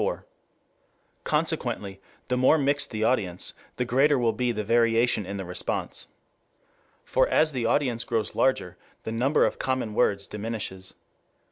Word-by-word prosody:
IV.] - - -2 1.0
Consequently 100 -1 -2 0.3
the 125 - 0
more 130 +5 +4
mixed 145 0 +1
the 110 -1 -3
audience, 95 -7 0 0.2
the 125 - -1
greater 135 +4 +3
will 115 -3 +1
be 120 +3 0
the 105 -2 -3
variation 115 -1 +2
in 100 +1 -4
the 95 - -5
response. 90 +1 -3 1.0
For - - +2
as 155 0 +3
the 125 -5 -1
audience 120 -4 +1
grows 115 -3 -1
larger, 90 -9 0 0.3
the - - -4
number 125 +6 +2
of - - -2
common 130 -5 -1
words 100 -3 +2
diminishes. 105 -3 -5
115 Hz, 145 wpm, -26 LUFS, 105-130 Hz, 1.0 s, more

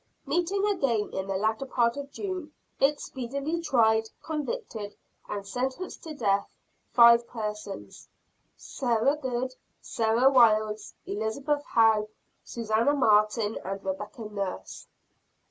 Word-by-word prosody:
Meeting 380 +4 0
again 275 - 0
in 190 0 -3
the 195 - -2
latter 220 +6 -1
part 235 -2 +2
of 280 0 -7
June, 370 -6 -5 0.3
it 285 +2 +3
speedily 280 +6 -4
tried, 220 -7 +3
convicted 300 - -4 0.3
and 200 -1 -4
sentenced 260 - -3
to 315 -2 -8
death 200 -6 +1 0.4
five 235 0 +7
persons: 210 -3 -6 0.5
Sarah 245 +1 0
Good, 260 -3 -3 0.3
Sarah 230 +4 +2
Wildes, 215 -4 +3
Elizabeth 265 +8 -2
How, 220 -4 +3 0.4
Susanna 230 +4 +1
Martin 215 -3 +3
and 195 +1 -5
Rebecca 205 +4 -5
Nurse. 200 - -5
235 Hz, 110 wpm, -28 LUFS, 215-280 Hz, 0.5 s, five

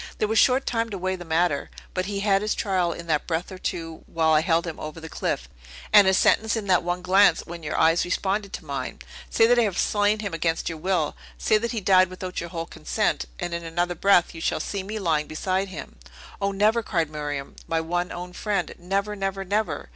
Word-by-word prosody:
"There 215 - +1
was 220 +1 +3
short 260 +1 +4
time 230 -1 0
to 200 - -4
weigh 185 +1 -1
the 175 - -8
matter; 165 -2 +1 0.2
but 185 0 -1
he 200 -1 -2
had 200 -1 +3
his 210 0 0
trial 185 -4 0
in 170 0 -7
that 155 -3 0
breath 170 +3 -2
or 185 - -8
two 165 -3 -4
while 160 -1 +1
I 155 - +5
held 165 0 +2
him 165 -2 -6
over 155 +1 -6
the 160 - -8
cliff, - - -2 0.5
and 205 -2 +8
his 190 0 +4
sentence 220 0 +3
in 220 -2 -3
that 185 -3 +3
one 175 +1 -2
glance, 185 -2 +5
when 170 0 -8
your 150 - -3
eyes 165 +2 +4
responded 195 +2 -1
to - - -6
mine! - - -4 0.3
Say 225 - +4
that 245 +1 +5
I - - +5
have 205 -6 0
slain 205 +1 +2
him 200 -4 -4
against 165 0 -1
your 165 -2 -6
will, 175 -3 0 0.2
say 215 - +3
that 235 +2 -2
he 225 -3 -2
died 185 -1 +5
without 185 -1 -5
your 170 - -6
whole 165 0 -4
consent, 160 -2 -1
and, 175 - -3
in 170 0 -3
another 175 +2 -1
breath, 180 0 +3
you 165 - -8
shall - - 0
see 200 - -3
me 205 +3 -5
lying 160 -7 0
beside 185 +5 -1
him." 185 -5 -9 0.4
"O, 200 0 +1
never!" 215 +4 +3
cried 165 -8 -1
Miriam. 145 -2 -4
"My 165 - +1
one, 175 +2 -2
own 180 +1 -7
friend! 205 +1 -2
Never, 200 +4 -1
never, 195 -1 -3
never!" 210 +3 -1
185 Hz, 230 wpm, -25 LUFS, 165-200 Hz, 0.5 s, and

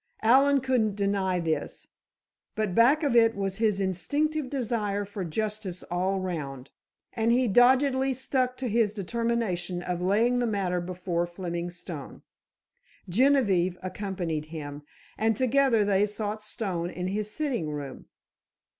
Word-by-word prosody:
Allen 275 +4 +5
couldn't 240 -6 +1
deny 195 -2 0
this, 160 -2 -3 0.7
but 215 -4 -1
back 265 - +5
of 275 -5 +1
it 225 -1 +5
was 195 -1 -2
his 215 -3 +1
instinctive 275 - -1
desire 215 -6 -1
for 200 -1 -5
justice 205 +1 -3
all 185 +2 0
round, 145 -8 -5 0.4
and 230 0 +1
he 250 +1 +3
doggedly 260 +4 +4
stuck 255 0 -1
to 260 - -3
his 220 -2 +2
determination 210 -4 -2
of 180 -1 -3
laying 225 +7 +2
the 240 - +1
matter 190 -4 -1
before 175 -1 -2
Fleming 175 -1 -4
Stone. 175 -4 -9 0.8
Genevieve 195 -5 +3
accompanied 185 -5 -3
him, 150 -2 -7 0.4
and 220 0 +2
together 255 -4 +3
they 200 0 +3
sought 210 +1 -4
Stone 195 -6 -3
in 180 0 -5
his 210 +2 -2
sitting 240 - -2
room. 145 -3 -6
205 Hz, 135 wpm, -27 LUFS, 180-240 Hz, 0.8 s, Allen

